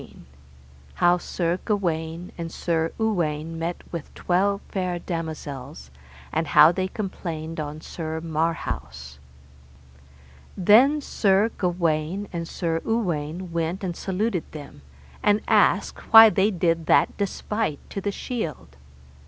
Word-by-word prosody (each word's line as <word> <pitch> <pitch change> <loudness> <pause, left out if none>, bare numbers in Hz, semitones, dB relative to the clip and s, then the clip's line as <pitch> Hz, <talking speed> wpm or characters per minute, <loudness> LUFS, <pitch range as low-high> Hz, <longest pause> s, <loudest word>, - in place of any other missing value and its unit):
How 175 0 +3
Sir 175 0 -2
Gawaine 170 -4 -2
and 165 -1 -6
Sir 165 -1 -1
Uwaine 165 -7 -1
met 170 +1 -3
with 165 -3 -6
twelve 200 +3 +1
fair 185 -2 -2
damosels, 155 - -6 0.4
and 160 +1 0
how 155 +2 +7
they 185 +1 -1
complained 165 -5 -5
on 150 +1 -5
Sir 160 -1 -5
Marhaus. 150 - -3 1.4
Then 245 +11 +5
Sir 205 -3 +2
Gawaine 175 +1 -1
and 170 -1 -3
Sir 165 -2 -2
Uwaine 175 -6 -2
went 170 +3 -2
and 175 -2 -3
saluted 190 -1 -2
them, 145 - -10 0.4
and 205 +1 +3
asked - - +2
why 225 -1 +10
they 195 +3 +3
did 165 -4 0
that - - +4
despite 205 -3 -2
to 195 - -4
the 205 - -1
shield. 165 - -5
170 Hz, 120 wpm, -24 LUFS, 160-195 Hz, 1.4 s, why